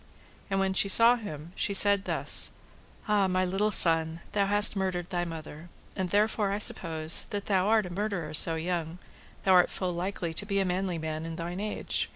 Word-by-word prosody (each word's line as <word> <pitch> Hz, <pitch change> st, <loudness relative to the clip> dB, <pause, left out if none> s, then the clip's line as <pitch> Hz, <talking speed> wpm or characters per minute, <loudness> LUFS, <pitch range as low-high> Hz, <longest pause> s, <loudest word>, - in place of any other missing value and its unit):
And 195 Hz, 0 st, -2 dB
when 190 Hz, 0 st, -1 dB
she 200 Hz, +1 st, +2 dB
saw 230 Hz, +4 st, +6 dB
him 165 Hz, -8 st, -9 dB
she 200 Hz, -, -2 dB
said 200 Hz, 0 st, +7 dB
thus: -, -, +2 dB, 0.6 s
Ah, 205 Hz, -2 st, +1 dB
my 185 Hz, 0 st, -1 dB
little 195 Hz, +4 st, -1 dB
son, 165 Hz, -4 st, +3 dB
thou 200 Hz, -1 st, -1 dB
hast 205 Hz, +1 st, +3 dB
murdered 185 Hz, -3 st, -4 dB
thy 175 Hz, -1 st, -2 dB
mother, 160 Hz, 0 st, -10 dB, 0.3 s
and 190 Hz, -2 st, -4 dB
therefore 210 Hz, +1 st, 0 dB
I 200 Hz, -, -2 dB
suppose, 160 Hz, -6 st, +1 dB
thou 205 Hz, -, -5 dB
that 200 Hz, -, -9 dB
art 205 Hz, +3 st, +1 dB
a 180 Hz, -, -9 dB
murderer 190 Hz, -6 st, -5 dB
so 160 Hz, +1 st, +5 dB
young, 165 Hz, 0 st, -5 dB, 0.5 s
thou 190 Hz, -, +1 dB
art 180 Hz, -1 st, +4 dB
full 185 Hz, -2 st, -5 dB
likely 175 Hz, -1 st, -5 dB
to 205 Hz, -, 0 dB
be 200 Hz, -1 st, -2 dB
a 195 Hz, -, -1 dB
manly 180 Hz, -1 st, -3 dB
man 155 Hz, 0 st, -6 dB
in 165 Hz, 0 st, -7 dB
thine 175 Hz, +2 st, -7 dB
age. 210 Hz, +1 st, -3 dB
185 Hz, 195 wpm, -27 LUFS, 165-200 Hz, 0.6 s, said